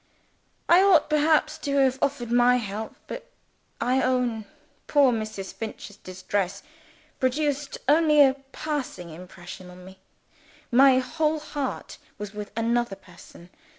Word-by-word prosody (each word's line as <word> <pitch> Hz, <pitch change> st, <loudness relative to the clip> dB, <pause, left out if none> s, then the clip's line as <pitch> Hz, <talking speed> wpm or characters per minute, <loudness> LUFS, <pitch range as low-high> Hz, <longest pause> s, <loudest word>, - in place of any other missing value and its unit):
I 345 Hz, +2 st, +6 dB
ought 365 Hz, -6 st, +4 dB
perhaps 305 Hz, 0 st, +2 dB
to 280 Hz, -1 st, -2 dB
have 265 Hz, -1 st, +3 dB
offered 255 Hz, -4 st, -1 dB
my 245 Hz, +1 st, +5 dB
help 215 Hz, -2 st, -4 dB
but, -, -, -8 dB, 0.5 s
I 255 Hz, +2 st, +1 dB
own, 250 Hz, -4 st, 0 dB, 0.4 s
poor 280 Hz, -4 st, +4 dB
Mrs. 215 Hz, -3 st, -5 dB
Finch's 215 Hz, -2 st, -7 dB
distress 185 Hz, +1 st, -3 dB, 0.6 s
produced 285 Hz, +2 st, -1 dB
only 300 Hz, +1 st, +4 dB
a 270 Hz, -2 st, +6 dB, 0.2 s
passing 270 Hz, -, -4 dB
impression 180 Hz, +2 st, -11 dB
on 180 Hz, 0 st, -13 dB
me. 190 Hz, 0 st, -14 dB, 0.7 s
My 260 Hz, +1 st, +6 dB
whole 305 Hz, +4 st, 0 dB
heart 290 Hz, -3 st, -5 dB, 0.2 s
was 210 Hz, 0 st, -7 dB
with 210 Hz, -1 st, -7 dB
another 235 Hz, -2 st, 0 dB
person. 180 Hz, -2 st, -16 dB
250 Hz, 125 wpm, -25 LUFS, 200-290 Hz, 0.7 s, I